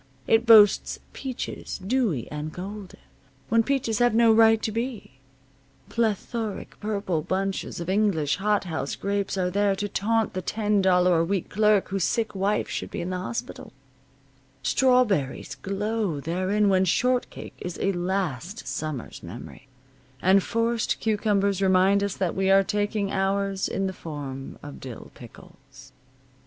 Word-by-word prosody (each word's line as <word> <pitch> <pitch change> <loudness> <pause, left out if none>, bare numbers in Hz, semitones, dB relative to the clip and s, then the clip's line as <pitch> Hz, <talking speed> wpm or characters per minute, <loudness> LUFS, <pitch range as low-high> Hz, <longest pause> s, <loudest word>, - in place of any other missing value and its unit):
It 225 +1 +3
boasts 210 -3 +6 0.2
peaches, 260 -3 -5
dewy 195 - -1
and 150 +1 -4
golden, 195 +2 -8 0.5
when 230 +1 +4
peaches 230 -4 -1
have 245 -2 +3
no 230 -1 +6
right 225 0 +6
to 220 - -1
be; 225 - -5 0.7
plethoric, 225 -1 -2
purple 200 -6 -2
bunches 190 +3 -2
of 170 - -5
English 185 -8 +1
hothouse 190 -8 -1
grapes 200 0 -2
are 180 -1 0
there 200 +1 +2
to 205 +1 -3
taunt 225 +2 0
the 185 - -3
ten 210 +1 0
dollar 180 -2 +4
a - - +3
week 185 +1 -2
clerk 210 -1 +3
whose 195 -1 -1
sick 225 +4 0
wife 200 +2 0
should - - -4
be - - -5
in 175 +2 -4
the 185 - -2
hospital; 120 -6 -6 0.9
strawberries 215 - +2
glow 200 -4 -2
therein 185 +7 0
when 190 -1 +4
shortcake 250 +7 0
is 180 -1 -6
a 195 - +1
last 180 - -3
summer's 155 -6 -5
memory, 135 - -10 0.5
and 190 +5 +4
forced 230 +2 -1
cucumbers 200 -3 +1
remind 190 +1 +4
us 200 -2 -2
that 185 -3 -1
we 190 0 +1
are 195 0 +6
taking 205 0 -1
ours 195 0 0
in 195 - -2
the 190 - -2
form 140 -6 -7
of 145 0 -9
dill 125 -4 -9
pickles. 130 +2 -15
195 Hz, 145 wpm, -25 LUFS, 180-215 Hz, 0.9 s, boasts